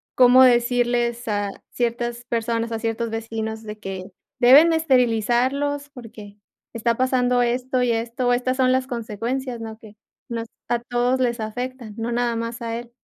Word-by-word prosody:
cómo 255 +1 +7
decirles 240 -1 +2
a 205 -1 -1 0.2
ciertas 240 0 -2
personas, 230 -1 -2
a 225 - -2
ciertos 230 0 -2
vecinos, 225 0 -4
de 215 0 -8
que 195 -2 -6 0.4
deben 270 +7 +8
de 330 - +2
esterilizarlos, 260 +1 +1
porque 220 -6 -12 0.4
está 230 0 0
pasando 250 -1 +2
esto 250 +1 0
y 245 - +2
esto, 235 +2 0
estas 255 +1 0
son 255 -1 +3
las 260 0 0
consecuencias, 240 +2 -4
¿no?, 220 -1 -7
que 215 -1 -15 0.3
nos 230 -1 -4 0.2
a 240 - +1
todos 245 +2 0
les 240 -1 0
afecta, 245 +1 -5
no 230 +1 -3
nada 240 0 0
más 230 +1 -4
a 230 0 -3
él. 240 0 -11
240 Hz, 160 wpm, -22 LUFS, 225-250 Hz, 0.4 s, deben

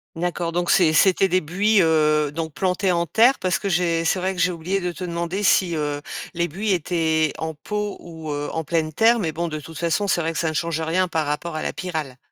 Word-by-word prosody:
D'accord, 175 0 -2
donc 175 +1 0
c 165 -4 +4
c'était 190 +4 +4
des 185 0 +2
buis, 200 +7 +2
heu, 155 -2 +2
donc 160 +1 -4
plantés 185 +2 0
en 170 -1 +1
terre, 235 - +4
parce 185 -2 0
que 200 - -3
j'ai 170 -2 +1
c'est 165 - +1
vrai 185 +1 -1
que 180 - -3
j'ai 180 +2 +3
oublié 180 +3 -2
de 180 0 -2
te 180 - -8
demander 170 +3 -3
si, 180 -3 +3
heu, 145 -1 -2 0.3
les 170 0 0
buis 195 +6 -2
étaient 160 -3 0
en 160 0 -4
pot 210 +6 -4
ou, 160 -2 -8
heu, 145 0 -3
en 160 - -3
pleine 160 0 -1
terre, 230 +7 +4
mais 165 -6 -1
bon, 170 +3 -3
de 155 -2 -4
toute 160 +1 -11
façon, 170 +5 0
c'est 175 - +1
vrai 165 0 -2
que 155 - -3
ça 165 - 0
ne - - -4
change 165 0 -1
rien 175 +4 +1
par 160 -4 -1
rapport 155 +3 -3
à 155 - -3
la - - -2
pyrale. 155 -8 -5
170 Hz, 250 wpm, -22 LUFS, 160-185 Hz, 0.3 s, c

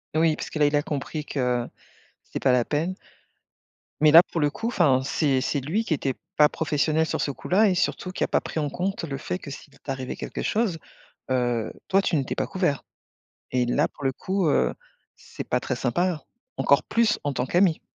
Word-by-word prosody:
Oui, 160 -1 +3
parce - - -6
que - - -5
là, 150 - +5
il 145 0 +2
a 145 - +3
compris 150 +1 -4
que 125 -4 -1 0.6
c'était - - -5
pas 130 - +3
la 125 -1 +3
peine. 160 +8 -1 1.1
Mais 150 -1 +6
là, 165 +2 +11
pour 170 - -4
le 145 -1 +3
coup, 225 - -4
enfin, 135 - +3
c'est 140 -1 +1
c'est 140 +1 0
lui 170 - -1
qui 175 - -1
était 135 -2 -1 0.2
pas 150 -1 +7
professionnel 155 0 0
sur - - -2
ce 140 - 0
coup-là, 195 +9 +2
et 185 - +1
surtout 185 0 -1
qui - - -2
a - - +1
pas - - +3
pris 160 - -4
en 150 - -1
compte 190 +6 -3
le 140 -4 -4
fait 180 - -3
que, 145 - -9
s'il 140 +1 -11
t'arrivait 135 -2 -5
quelque - - -5
chose, 215 -6 0 0.5
heu, 120 -3 0
toi, 195 0 +3
tu 170 - +1
n'étais 140 -2 -1
pas - - -2
couvert. 175 -7 0 0.7
Et 125 -1 +2
là, 145 +6 +1
pour 140 - -9
le 135 - +1
coup, 185 +5 -1
heu, - - +2 0.4
c'est - - -8
pas 125 - +1
très 130 - -3
sympa, 160 +7 0 0.3
encore 140 - +3
plus 230 -2 +2
en 145 - 0
tant 125 - -1
qu'ami. 175 +1 +3
150 Hz, 215 wpm, -25 LUFS, 135-175 Hz, 1.1 s, là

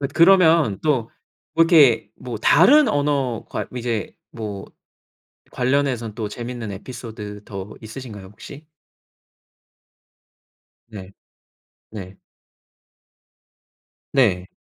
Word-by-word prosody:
엇 140 0 -3
그러면 165 - +5
또 130 -7 0 0.5
뭐 165 - +6
이렇게 150 -9 +5
뭐 125 -3 -7
다른 245 - +5
언어 140 - -1
괄 - - -4
이제 115 -4 -3 0.2
뭐 105 -4 -7 0.8
관련해서는 125 -4 -1
또 110 -2 -4
재밌는 120 -1 -6
에피소드 105 -1 -8
더 100 0 -8
있으신가요 110 -3 -9
혹시? 115 +9 -12 2.2
네. 100 -4 -10 0.8
네. 95 -3 -9 2.0
네. 95 -9 +2
120 Hz, 170 characters per minute, -21 LUFS, 105-145 Hz, 2.2 s, 뭐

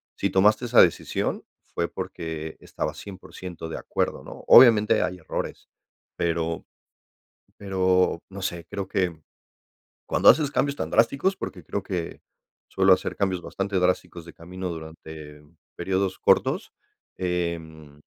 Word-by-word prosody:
si - - -1
tomaste 105 +5 +4
esa 120 0 +6
decisión, 85 - 0 0.3
fue - - -1
porque 80 -1 -6
estabas 75 0 -5
100% 90 -3 -9
de - - -5
acuerdo, - - -2
¿no? - - -11
Obviamente 110 -4 +7
hay 90 0 -3
errores, 80 - -5 0.5
pero 85 -1 -2 0.9
pero 95 -3 +1
no 100 0 -8
sé, 85 -3 -4
creo 100 -2 -4
que, 95 -2 0
mm, 80 -2 -16 0.9
cuando - - +3
haces 150 -3 +6
cambios 140 0 0
tan - - -4
drásticos, 140 +11 +2
porque 90 - -7
creo 100 - -3
que 90 -4 -5 0.5
suelo 95 0 +4
hacer 90 - +1
cambios 95 -3 0
bastante 100 0 -3
drásticos 90 -1 -1
de 85 - -12
camino 90 +2 -7
durante 80 -2 -9 0.4
periodos 95 +1 -1
cortos, - - +2 0.4
em, 80 -4 -4
90 Hz, 135 wpm, -25 LUFS, 85-95 Hz, 0.9 s, Obviamente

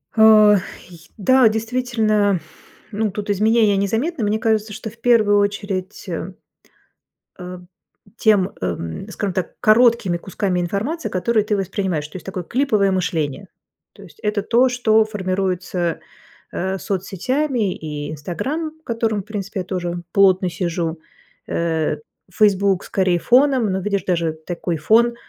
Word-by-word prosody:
Ох, 215 -2 +7 0.3
и 170 -2 -13 0.2
да, 255 +4 +5
действительно, 220 -3 0 0.5
ну, 215 0 -1
тут 205 +1 -6
изменения 215 0 +3
незаметны. 225 - -1
Мне 210 +1 0
кажется, 220 -1 0
что 220 - -6
в 230 - -18
первую 225 -4 +4
очередь, 200 -1 -3
э, 180 +1 -5 1.0
а, 180 0 -8 0.6
тем 205 -5 +3
эм, 85 - -4
скажем 205 -2 -3
так, 180 -1 -3
короткими 230 -5 +4
кусками 180 +1 -2
информации, 215 - -2
которые 215 +4 +1
ты 210 -1 0
воспринимаешь, 190 -5 -2
то 155 - -10
есть 185 - -10
такое 185 -1 -4
клиповое 220 - +1
мышление. 170 -1 -2 0.5
То - - -15
есть - - -15
это 210 -1 -1
то, 240 +5 +3
что 220 -3 +3
формируется, 185 -4 -2 0.5
э, 190 +1 -2
соцсетями 205 - -1
и 150 -1 -6
"Инстаграм", 260 - -4
в - - -39
котором, 225 -3 -1
принципе, 200 -2 -5
тоже 175 -2 -4
плотно 190 -2 +4
сижу, 170 -2 -3 0.5
э, 160 -2 0 0.4
"Фейсбук" 200 -2 +2
скорее 185 -2 +1
фоном, 250 0 +3
но, 190 - -1
видишь, 200 -1 -1
даже 170 -3 0
такой 170 +2 -4
фон, 230 +9 +3
200 Hz, 135 wpm, -20 LUFS, 180-220 Hz, 1.0 s, Ох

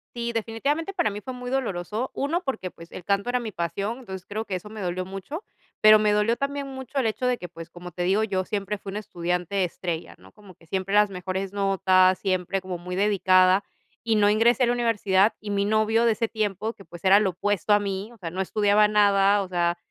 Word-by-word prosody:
Sí, 235 0 -3
definitivamente 275 - -2
para 345 - +1
mí 205 +1 -6
fue 255 +5 -7
muy 250 0 -6
doloroso. 225 -2 -2
1, 330 +6 -1
porque, 220 - -3
pues, 170 0 -14
el 180 - -8
canto 200 +3 0
era 250 0 +1
mi 225 -3 -5
pasión, 200 +7 -3
entonces 190 -6 -8
creo 215 +2 -4
que 195 - -4
eso 195 +3 -6
me 215 0 -8
dolió 185 -1 -2
mucho, 195 - -7 0.4
pero 215 0 +9
me 210 -1 +2
dolió 210 +3 +2
también 280 +1 -3
mucho 265 0 -6
el 260 - +1
hecho 225 +3 -1
de 250 0 +2
que, 180 - -8
pues, 165 0 -10
como 180 +1 -10
te 175 +1 -5
digo 195 +4 +2
yo, 190 -3 -1
siempre 205 +1 -3
fui 195 - -8
una 205 +2 -4
estudiante 180 0 -2
estrella, 170 -1 -4
¿no? - - -18
Como 205 -3 -16
que 165 - -23
siempre 190 +3 -2
las 210 -1 +5
mejores 190 +1 -4
notas, 190 -2 +3
siempre 190 0 -1
como 185 -1 -5
muy 180 +1 -6
dedicada, 190 -1 +4 0.4
y 225 -1 +1
no 205 -1 +4
ingresé 230 +4 +3
a - - +5
la 240 - +2
universidad, 210 -4 +2
y 210 - -6
mi 200 0 0
novio 220 +2 +2
de 230 - +4
ese 225 +1 -1
tiempo, 215 0 -2
que 195 - -16
pues, 175 +1 -12
era 195 +2 +6
lo 200 -3 +1
opuesto 205 +2 +1
a - - +5
mí, 200 +1 -4
o - - -17
sea, 175 -6 -6
no 185 +3 -4
estudiaba 205 +2 +3
nada, 200 -1 +4
o 190 - -6
sea, 175 -1 0
205 Hz, 235 wpm, -25 LUFS, 185-225 Hz, 0.4 s, pero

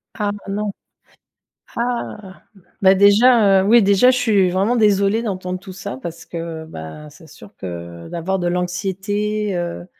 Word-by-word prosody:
Ah 205 -1 -1 0.2
non. 205 0 -2 1.0
Ah! 230 -5 -4 0.4
Bah, 190 0 +6
déjà, 205 0 +5
heu, - - -2
oui, 230 -1 +6
déjà, 200 +5 +5
je 255 - 0
suis 205 -6 +2
vraiment 195 +7 +1
désolée 210 0 +2
d'entendre 185 -4 -4
tout 190 -1 -11
ça 130 -9 -7
parce 165 +4 -8
que, 165 -1 -6
ben, 150 - -9
c'est 160 +2 -17
sûr 105 -9 -15
que 85 -2 -8
d'avoir 185 +3 -2
de 175 - -1
l'anxiété, 195 +3 -2
heu, 175 0 -4
190 Hz, 150 wpm, -19 LUFS, 170-210 Hz, 1.0 s, Bah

